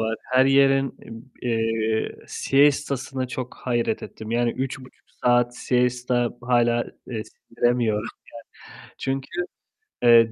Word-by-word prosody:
var, 110 0 0
her 130 +1 +3
yerin, 135 0 +4
ım 115 +3 -11
eee, 115 -2 0
siesta'sına 135 -2 +1
çok 125 -1 -5
hayret 120 -2 0
ettim. 110 0 -8
Yani, 120 0 +1
3,5 130 0 -6 0.2
saat 120 0 +3
siesta 125 -1 +1
hâlâ, 120 -1 +2 0.2
ııı, 110 -4 -3
sindiremiyorum 115 -2 -1 0.7
yani. - - -15
Çünkü, 135 0 -2 0.8
eee, 115 -1 +7
120 Hz, 110 wpm, -24 LUFS, 115-130 Hz, 0.8 s, eee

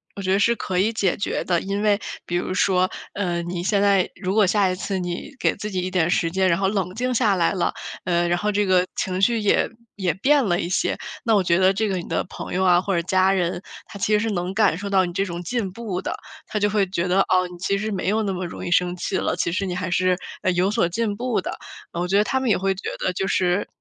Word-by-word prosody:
我 200 - -6
觉 185 -1 -1
得 195 - +4
是 235 +4 +3
可 190 -4 -3
以 210 +5 +2
解 195 -5 +1
决 - - -2
的。 175 -2 +1
因 200 +1 -2
为 205 -1 +3 0.3
比 175 - -2
如 175 +1 -1
说， 185 0 +2 0.2
呃， 175 -4 -1
你 175 0 -4
现 200 +1 +2
在 200 -2 +3
如 190 0 -1
果 215 -2 +5
下 195 0 +2
一 185 - -1
次 190 +1 -3
你 175 +8 -4
给 - - +1
自 210 - -5
己 185 - -1
一 185 - -2
点 180 -3 +1
时 165 - +2
间， 190 +2 +1
然 170 -1 +2
后 195 - +2
冷 190 -3 -1
静 250 +4 -1
下 220 -4 +3
来 170 -2 +2
了， 185 - 0 0.3
呃， 175 -1 +1
然 175 0 +1
后 210 +3 0
这 205 0 +1
个 185 -1 +4
情 185 -1 -2
绪 235 +1 +3
也 210 -2 +2 0.3
也 185 -4 0
变 275 +7 +3
了 175 -3 +1
一 170 - -2
些， 185 - 0 0.3
那 230 -4 +2
我 200 - +4
觉 175 -2 +2
得 190 +1 +4
这 215 +3 0
个 190 -2 -1
你 175 - -6
的 - - 0
朋 - - -7
友 185 +1 +1
啊， 180 -1 +5
或 195 +2 -2
者 170 - +1
家 185 +2 +2
人， 180 -1 -1 0.2
他 - - -9
其 205 +2 0
实 210 - +4
是 225 +1 -1
能 180 0 -2
感 200 -5 +3
受 200 +2 -5
到 195 -1 +3
你 175 - -6
这 195 - 0
种 170 -2 -5
进 210 0 -2
步 200 -3 -4
的。 - - -3 0.3
他 215 - -2
就 205 0 +2
会 205 -1 +2
觉 185 -1 -2
得， 185 +2 +3
哦， 185 -1 +2
你 175 - -10
其 195 +3 0
实 215 +1 -2
没 195 - -3
有 215 +3 +2
那 200 -3 -1
么 185 0 -3
容 170 - -7
易 - - -3
生 180 0 +2
气 180 +2 -2
了。 - - 0
其 170 - -1
实 190 +3 -1
你 185 - -3
还 185 0 -3
是， 185 +1 +2 0.3
呃， 185 - +3
有 180 +2 +2
所 210 -4 +2
进 210 +3 -1
步 240 -4 -1
的， - - -5 0.4
嗯， 170 - -2
我 - - -2
觉 195 +2 +2
得 - - +4
他 265 +5 0
们 260 -2 -1
也 - - +3
会 195 0 0
觉 190 - -5
得 185 - -1
就 190 +2 -2
是 185 0 +1
190 Hz, 305 characters per minute, -23 LUFS, 180-205 Hz, 0.4 s, 果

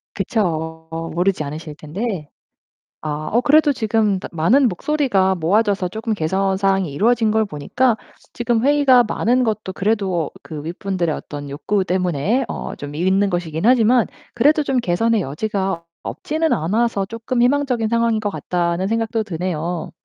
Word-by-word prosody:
그쵸. 160 -6 -2 0.3
모르지 180 -2 +1
않으실 150 +1 -7
텐데. 165 +1 -4 0.7
아 155 0 -4
어 240 +3 +3
그래도 295 +2 +5
지금 220 -5 +1
다 - - -7
많은 225 - +3
목소리가 200 - +1
모아져서 195 +2 +1
쪼금 220 +2 -3
개선 190 +3 0
사항이 195 -5 +1
이루어진 225 +7 +2
걸 220 0 +2
보니까 220 - 0 0.4
지금 240 -1 0
회의가 280 -4 +5
많은 245 +3 +1
것도 215 -4 -2
그래도 195 -6 0
그 150 -2 -8
윗분들의 175 -1 -2
어떤 145 -2 -7
욕구 190 +8 0
때문에 185 - 0
어 - - -5
좀 145 0 -8
있는 190 +4 +2
것이긴 170 -2 -2
하지만 245 -1 +4 0.3
그래도 295 +6 +3
좀 270 -2 0
개선의 225 +3 +1
여지가 190 +3 -2 0.2
없지는 315 +1 -2
않아서 200 +4 0
쪼끔 230 +3 -2
'희망적인 250 -3 +1
상황인 230 -1 +2
것 210 - -1
같다.'는 175 +1 -1
생각도 225 0 0
드네요. 175 -2 -3
200 Hz, 335 characters per minute, -20 LUFS, 170-230 Hz, 0.7 s, 그래도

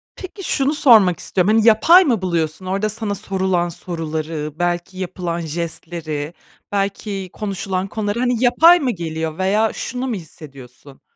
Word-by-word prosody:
Peki, 385 +1 -9
şunu 280 -1 +1
sormak 215 - +5
istiyorum, 195 +3 +1
hani, 225 +1 +3
yapay 330 - +7
mı 235 - 0
buluyorsun? 165 -1 -2
Orada 195 +3 -1
sana 215 -1 -3
sorulan 190 -3 -1
soruları, 160 -3 -5
belki 175 +1 -2
yapılan 180 -2 -4
jestleri, 160 -1 -5 0.4
belki 195 -1 -3
konuşulan 195 -2 -3
konuları, 210 +1 -3
hani, 245 -1 0
yapay 335 +8 +6
mı 260 -4 0
geliyor 160 -3 -4
veya 210 +4 +1
şunu 255 +1 -4
mu 235 - -2
hissediyorsun? 140 -5 -12
185 Hz, 140 wpm, -19 LUFS, 165-220 Hz, 0.4 s, yapay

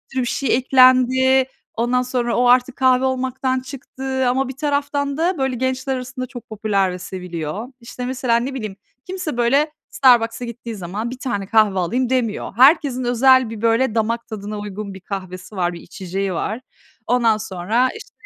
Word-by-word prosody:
bir 255 -2 +1
şey 240 0 0
eklendi, 260 0 +5 0.3
ondan 240 +2 +1
sonra 245 -1 -1
o 245 - +3
artık 250 +1 +4
kahve 260 0 +3
olmaktan 260 0 -1
çıktı 265 0 -4
ama 265 +1 0
bir 265 - -8
taraftan 285 -1 -1
da, 340 +1 +1
böyle, 265 -2 -1
gençler 260 +1 -1
arasında 255 0 -5
çok 245 -1 -11
popüler 200 -3 0
ve 180 - -6
seviliyor. 180 +2 -5
İşte, 245 +1 -7
mesela 250 -2 +1
ne 255 +3 -3
bileyim, 215 -7 -5 0.3
kimse 365 -8 -4
böyle 275 +6 +2 0.2
Starbucks'a 240 -2 +3
gittiği 235 -1 -7
zaman 200 +5 -4
1 255 - -7
tane 205 -7 -3
kahve 210 -3 +3
alayım 240 +8 0
demiyor. 245 -5 -1
Herkesin 265 -1 +4
özel 250 0 +4
bir, 225 -1 -7
böyle, 230 +1 +2
damak 230 +1 -1
tadına 210 -1 -6
uygun 205 -1 -6
bir 190 - -10
kahvesi 185 +1 -7
var, 175 -1 0
bir 170 - -9
içeceği 190 +1 -4
var. 215 +8 -3 0.5
Ondan 230 -2 +3
sonra 215 +5 0
işte - - -13
245 Hz, 170 wpm, -20 LUFS, 215-260 Hz, 0.5 s, eklendi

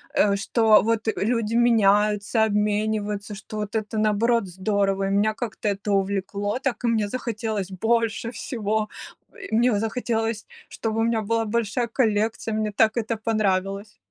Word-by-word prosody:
э, 200 -1 +4
что 215 +2 +4
вот 225 0 0
люди 230 0 0
меняются, 210 -2 +3
обмениваются, 210 -1 -1
что 215 +1 -9
вот 210 0 -4
это 220 0 -2
наоборот 215 +1 +2
здорово, 195 +1 0
и - - -1
меня 205 +2 +2
как-то 220 -1 -5
это 200 +1 -3
увлекло, 200 +3 -1
так 265 -2 -2
и 240 - +1
мне 220 -3 +1
захотелось 220 -4 -3
больше 230 +3 0
всего. 220 -3 -2 0.6
И 220 - -1
мне 240 +1 +3
захотелось, 225 -1 -2 0.2
чтобы 225 -1 -3
у 225 - +2
меня 230 -1 +1
была 225 +1 0
большая 235 +2 -1
коллекция, 220 -2 0
мне 215 0 -1
так 220 +2 +2
это 225 -1 -1
понравилось. 200 -2 -1
215 Hz, 150 wpm, -24 LUFS, 205-230 Hz, 0.6 s, э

